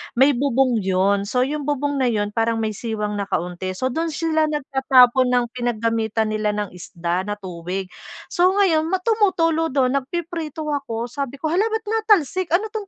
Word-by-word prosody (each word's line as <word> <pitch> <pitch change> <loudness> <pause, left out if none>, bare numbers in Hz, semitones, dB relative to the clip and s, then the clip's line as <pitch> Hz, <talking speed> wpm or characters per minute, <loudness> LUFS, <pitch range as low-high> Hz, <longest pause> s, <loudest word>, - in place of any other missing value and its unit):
may 265 +4 +5
bubong 260 -2 +1
'yon. 195 +1 +1
So 250 +4 +1
'yong 290 +2 -3
bubong 285 -1 -1
na 260 - +2
'yon, 210 -3 0
parang 225 0 0
may 215 - -1
siwang 210 -1 -3
na 200 - -3
kaunti. 180 +1 -3
So 255 +7 -1
do'n 325 +5 -1
sila 315 -1 0
nagtatapon 265 -3 +3
ng 245 -1 +2
pinaggamitan 225 -2 -1
nila 215 -1 -1
ng 210 -2 -3
isda 175 +1 -4
na 205 - -2
tubig. 185 -1 -6 0.4
So 365 +2 +3
ngayon, 330 -6 +3
ma 370 +1 -1
tumutulo 345 -7 +2
do'n, 270 -2 +1
nagpiprito 320 +1 -5
ako 270 -6 -3
sabi 275 -1 -4
ko, 310 +3 -3
"Hala 390 +6 +2
ba't 445 0 -2
natalsik? 410 - +1
Ano 425 +4 -1
'tong 430 -3 -5
260 Hz, 175 wpm, -21 LUFS, 215-320 Hz, 0.4 s, may